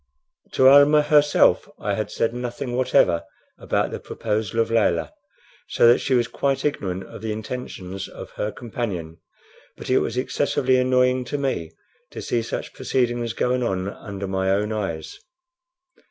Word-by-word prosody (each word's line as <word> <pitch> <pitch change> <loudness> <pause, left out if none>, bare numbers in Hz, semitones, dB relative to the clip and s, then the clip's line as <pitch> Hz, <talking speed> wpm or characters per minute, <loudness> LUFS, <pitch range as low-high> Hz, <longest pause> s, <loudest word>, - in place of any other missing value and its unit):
To 130 - +5
Almah 145 +2 +7
herself 150 -1 +4
I - - -1
had - - -2
said 115 - -1
nothing 120 0 -4
whatever 125 -9 +3 0.4
about - - -1
the - - -5
proposal 110 -1 -3
of 115 0 +1
Layelah, 115 -1 +1 0.5
so - - +4
that 120 - +6
she 135 - 0
was 120 -1 +2
quite 135 +2 -1
ignorant 95 -10 -2
of 95 - -11
the 110 -1 -3
intentions 105 -4 -6
of - - -10
her 105 - -3
companion; 100 -10 -5 0.6
but - - -5
it 130 - +5
was - - -3
excessively 130 0 +1
annoying 125 0 +2
to 145 - -3
me 130 - -2 0.4
to - - -8
see 120 - -1
such - - -5
proceedings 120 -2 -1
going 125 0 0
on 95 -5 -1
under 100 -1 -7
my 95 0 -1
own 105 +2 +1
eyes. 90 -7 -4
120 Hz, 155 wpm, -23 LUFS, 100-130 Hz, 0.6 s, Almah